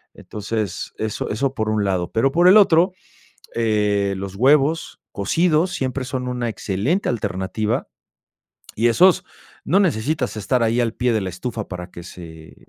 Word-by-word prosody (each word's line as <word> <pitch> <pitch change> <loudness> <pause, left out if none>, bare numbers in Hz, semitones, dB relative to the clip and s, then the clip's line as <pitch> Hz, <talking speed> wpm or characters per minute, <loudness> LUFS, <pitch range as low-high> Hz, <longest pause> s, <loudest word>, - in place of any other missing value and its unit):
Entonces, 105 -2 -4
eso 110 -1 -3
eso 130 +5 -1
por 110 -4 -2
un 110 -1 +1
lado. 90 -3 -1
Pero 135 +4 +2
por 175 +3 +4
el 190 +3 +8
otro, 180 -2 +5 0.6
eh, 105 -3 +1
los 95 0 -6
huevos 145 +7 +2
cocidos 165 - +1
siempre 130 -4 -3
son 125 -1 -4
una 125 -2 -2
excelente 110 - -1
alternativa 105 0 -2 0.9
y 115 +2 +2
esos 180 +10 +4 0.4
no 190 - +3
necesitas 140 - -1
estar 120 +4 0
ahí 115 +1 +1
al 115 -2 0
pie 125 0 0
de 110 - +2
la 95 - -3
estufa 110 +5 -5
para 90 -1 -7
que 85 - -10
se 80 -2 -12
115 Hz, 155 wpm, -21 LUFS, 100-140 Hz, 0.9 s, el